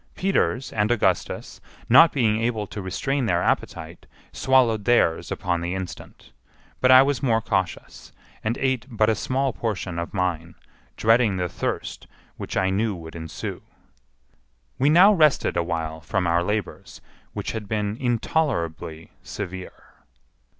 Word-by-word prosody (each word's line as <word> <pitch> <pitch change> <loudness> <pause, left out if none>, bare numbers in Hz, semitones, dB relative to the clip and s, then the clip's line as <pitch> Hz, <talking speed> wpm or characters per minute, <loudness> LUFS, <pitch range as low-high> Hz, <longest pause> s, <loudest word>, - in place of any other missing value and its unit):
Peters 135 - 0
and 105 0 +1
Augustus, 100 -6 -1 0.3
not 140 +7 +7
being 110 -5 +1
able 115 -2 -1
to 100 - -7
restrain 125 +8 -2
their 85 -3 +1
appetite, 80 +1 -3 0.2
swallowed 120 -6 +2
theirs 120 -9 +2
upon 90 -2 -2
the 85 +2 -3
instant; 95 -1 -8 0.5
but 130 - +3
I 130 0 +9
was 140 -4 -1
more 115 -4 +2
cautious, 95 -4 -3 0.3
and 115 +2 -1
ate 130 -2 -1
but 110 -2 +2
a - - +2
small 130 +4 -1
portion 95 -6 -3
of 85 - -4
mine, 85 -3 -2 0.4
dreading 115 -3 +3
the 90 -1 -1
thirst - - -4 0.3
which - - -5
I 95 0 +1
knew 105 +1 0
would 80 -1 -10
ensue. 80 -1 -6 1.2
We 135 +3 +3
now 185 +7 +7
rested 155 -6 +3
a 85 - +2
while 80 -2 -4
from 90 +4 -1
our 85 0 +2
labors, 105 +1 -4 0.3
which - - -4
had 110 -3 -6
been 105 0 -2
intolerably 110 - -2
severe. 95 -2 -8
105 Hz, 145 wpm, -24 LUFS, 90-125 Hz, 1.2 s, I